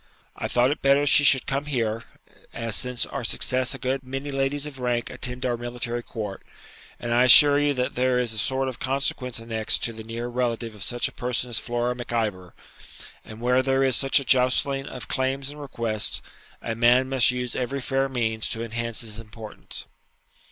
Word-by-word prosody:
I - - -3
thought 125 +2 +2
it 150 - -3
better 140 +1 +4
she 145 - +5
should 135 -1 +5
come 140 +1 -2
here, 115 -5 -2 0.5
as 115 -2 -2
since 125 0 0
our 140 - -5
success 130 +3 0
a - - -6
good 135 +1 -2
many 135 +2 -5
ladies 135 +1 -1
of 140 -3 -8
rank 120 -1 -1
attend 125 0 -4
our 120 -1 +1
military 120 0 -4
court; 105 -4 -6 0.6
and 120 0 -2
I 120 +1 +5
assure 145 +3 +9
you 145 -1 +1
that 130 +1 -1
there 125 0 +1
is 120 -2 0
a 110 - -4
sort 135 +3 0
of 130 - -6
consequence 130 -2 -1
annexed 115 -1 0
to 115 - 0
the 110 0 -9
near 115 +2 -5
relative 120 -2 -2
of 105 - -14
such 120 +5 0
a - - -10
person 125 0 -2
as 115 - 0
Flora 120 0 -1
Mac 120 -1 -8
Ivor, 105 -7 -2 0.7
and 110 +1 -11
where 125 +1 +3
there 135 0 +1
is 130 -2 +2
such 135 +1 +3
a 140 - -6
justling 130 +2 +2
of 120 -5 -8
claims 135 +1 -1
and 150 0 -10
requests, 115 -6 -2 0.4
a 115 - -2
man 120 +3 +4
must 130 -2 +3
use 125 -1 -2
every 130 +2 -2
fair 135 +1 0
means 110 -3 -1
to 115 - -3
enhance 115 0 -2
his 110 -2 -5
importance.' 110 0 -7
125 Hz, 200 wpm, -25 LUFS, 115-135 Hz, 0.7 s, assure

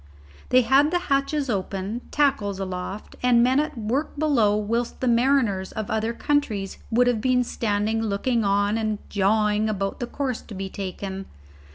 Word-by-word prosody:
They 255 - +6
had 270 +5 +4
the 355 - +1
hatches 285 -3 0
open, 200 +1 -3
tackles 270 -9 +1
aloft, 185 +2 -5
and 245 -1 +4
men 260 +3 +3
at 300 -3 -2
work 245 +8 -2
below 240 -9 +3
whilst 230 +3 -2
the 255 - -1
mariners 235 -6 +2
of 215 -1 -4
other 220 +1 0
countries 230 -7 -1
would 245 +2 +3
have 245 -3 +1
been 255 0 +2
standing 220 -1 -1
looking 225 +2 0
on 205 +2 +2
and 215 -1 -1
"jawing" 210 +1 +2
upon 195 -2 -2
the 245 - -3
course 260 -2 -3
to 215 - -11
be 190 0 -4
taken. 195 0 -6
225 Hz, 165 wpm, -24 LUFS, 205-255 Hz, -, They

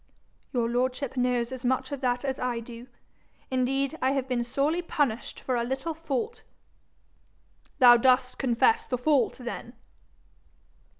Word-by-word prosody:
'Your 240 -3 0
lordship 255 +2 -1
knows 250 -1 0
as 260 -1 -7
much 260 +1 0
of 280 - -4
that 250 0 0
as 265 -1 -2
I 245 -2 -1
do. 235 +1 -10 0.6
Indeed, 270 +4 0
I 260 +1 +2
have 270 -2 -1
been 250 -2 0
sorely 280 +8 0
punished 285 -9 -2
for 255 - -1
a 235 - 0
little 265 +6 -3
fault.' 320 - -3 1.4
'Thou 245 -3 +8
dost 255 +1 +2
confess 360 - +2
the 250 - -1
fault 265 -1 +2
then?' 240 0 -6
255 Hz, 140 wpm, -27 LUFS, 245-275 Hz, 1.4 s, Thou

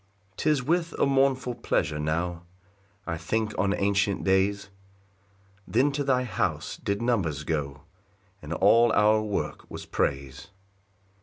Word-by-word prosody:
4 - - -37
'Tis 150 -4 +1
with 165 +3 0
a - - +4
mournful 135 -2 +2
pleasure 80 -10 -1
now 85 +3 -2 0.6
I 85 - -3
think 110 +3 -1
on 100 +1 +2
ancient 100 -1 0
days; 100 +2 +1 1.0
Then 140 +3 +2
to 145 +1 -2
thy 130 -2 +2
house 125 - -2
did 100 +3 -2
numbers 90 - 0
go, 75 -3 -3 0.6
And - - -9
all 115 0 +4
our 105 +1 +4
work 105 -2 -4
was - - -8
praise. 70 -2 -2
100 Hz, 135 wpm, -26 LUFS, 85-125 Hz, 1.0 s, a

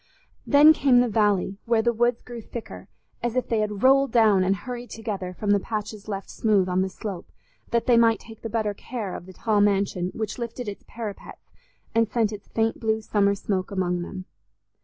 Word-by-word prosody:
Then 295 +2 +8
came 270 -5 +4
the 245 - +3
valley, 205 -3 +1
where 230 -1 +2
the 235 0 +2
woods 240 +1 +1
grew 240 -1 -8
thicker, 230 +1 -9 0.3
as 240 0 -2
if 255 - 0
they 225 - +1
had 210 0 -2
rolled 275 +1 +5
down 215 -5 +4
and 190 +1 +2
hurried 245 +3 -7
together 210 -5 -5
from 205 +3 -2
the 205 - +4
patches 210 0 -5
left 195 -2 -4
smooth 205 -4 +2
on 180 0 +1
the 190 - 0
slope, 190 -2 -7 0.4
that 235 -1 0
they 240 -2 +5
might 230 -1 +4
take 225 -1 -13
the 225 - -5
better 215 -2 -1
care 210 -2 -6
of 175 - -8
the 185 - -11
tall 210 +2 +1
mansion 195 -3 +1
which 220 +1 -4
lifted 235 0 -5
its 205 - -6
parapets 220 -4 -8 0.4
and 230 -1 +2
sent 220 -1 +1
its 205 -1 -9
faint 225 0 -1
blue 220 -1 0
summer 200 -2 +2
smoke 195 -2 -2
among 180 -3 -1
them. 185 +1 -7
215 Hz, 200 wpm, -25 LUFS, 200-235 Hz, 0.4 s, Then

